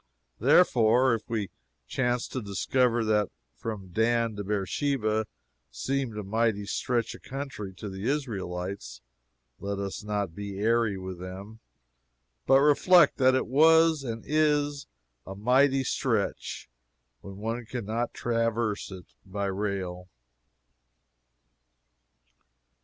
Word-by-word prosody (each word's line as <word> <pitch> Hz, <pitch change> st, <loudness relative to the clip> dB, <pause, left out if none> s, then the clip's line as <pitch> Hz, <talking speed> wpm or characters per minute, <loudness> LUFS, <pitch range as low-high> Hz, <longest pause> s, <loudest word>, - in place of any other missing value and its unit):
Therefore, 125 Hz, -, +5 dB
if 115 Hz, -, -4 dB
we 110 Hz, -5 st, -2 dB, 0.3 s
chance 125 Hz, -2 st, -1 dB
to 130 Hz, -, -4 dB
discover 115 Hz, +4 st, +1 dB
that 105 Hz, -2 st, +2 dB, 0.3 s
from 95 Hz, -, -6 dB
Dan 115 Hz, +2 st, +1 dB
to 105 Hz, -, -4 dB
Beersheba 110 Hz, -, -1 dB, 0.4 s
seemed 135 Hz, -5 st, -2 dB
a 105 Hz, -, -3 dB
mighty 110 Hz, 0 st, 0 dB
stretch 120 Hz, +3 st, -1 dB
of -, -, -12 dB
country 135 Hz, -7 st, -6 dB
to 105 Hz, -, -7 dB
the 95 Hz, +4 st, -3 dB
Israelites, 95 Hz, -, -4 dB, 0.6 s
let 100 Hz, 0 st, -3 dB
us 100 Hz, +1 st, -4 dB
not 105 Hz, -4 st, -2 dB
be 100 Hz, +1 st, -6 dB
airy 110 Hz, -1 st, +2 dB
with 95 Hz, -1 st, -7 dB
them, 95 Hz, +4 st, -8 dB, 0.9 s
but 135 Hz, +1 st, +6 dB
reflect 150 Hz, +3 st, +5 dB
that 130 Hz, -1 st, +4 dB
it 130 Hz, -, +1 dB
was 160 Hz, +3 st, +5 dB
and 115 Hz, -3 st, -5 dB
is 145 Hz, -2 st, +1 dB, 0.4 s
a 95 Hz, -, -6 dB
mighty 130 Hz, +6 st, +3 dB
stretch 115 Hz, -6 st, -2 dB, 0.5 s
when 100 Hz, -1 st, -10 dB
one 115 Hz, +3 st, -3 dB
can 120 Hz, -2 st, -5 dB
not 115 Hz, +3 st, -2 dB
traverse 115 Hz, -2 st, -1 dB
it 95 Hz, -2 st, -9 dB, 0.2 s
by 100 Hz, +1 st, -4 dB
rail. 95 Hz, -2 st, -3 dB
110 Hz, 120 wpm, -28 LUFS, 100-130 Hz, 0.9 s, but